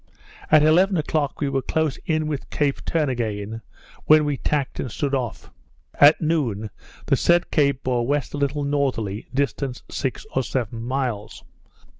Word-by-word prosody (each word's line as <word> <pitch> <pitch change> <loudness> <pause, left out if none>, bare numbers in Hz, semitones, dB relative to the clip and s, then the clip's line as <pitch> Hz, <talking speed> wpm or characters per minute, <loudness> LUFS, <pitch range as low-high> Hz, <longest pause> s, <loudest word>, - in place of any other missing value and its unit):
At 155 -1 +6
eleven 180 +5 +4
o'clock 150 -2 -1
we 145 - +1
were 135 -1 0
close 155 0 -1
in 155 -1 +1
with 150 -3 -4
Cape 145 -2 -1
Turnagain, 115 -8 -2 0.4
when 155 0 +6
we 145 -1 0
tacked 140 0 -2
and 125 - -3
stood 140 +4 -2
off; 125 -5 -3 0.4
at 145 +2 +6
noon 125 -11 -1 0.3
the - - +3
said 175 0 +2
Cape 140 -3 +2
bore 120 -2 0
west 145 0 -1
a - - -3
little 140 +1 0
northerly, 130 -8 -1
distant 135 -1 -2
six 130 -4 -3
or 130 - +3
seven 120 -3 -3
miles. 120 -4 -3
140 Hz, 155 wpm, -23 LUFS, 120-150 Hz, 0.4 s, At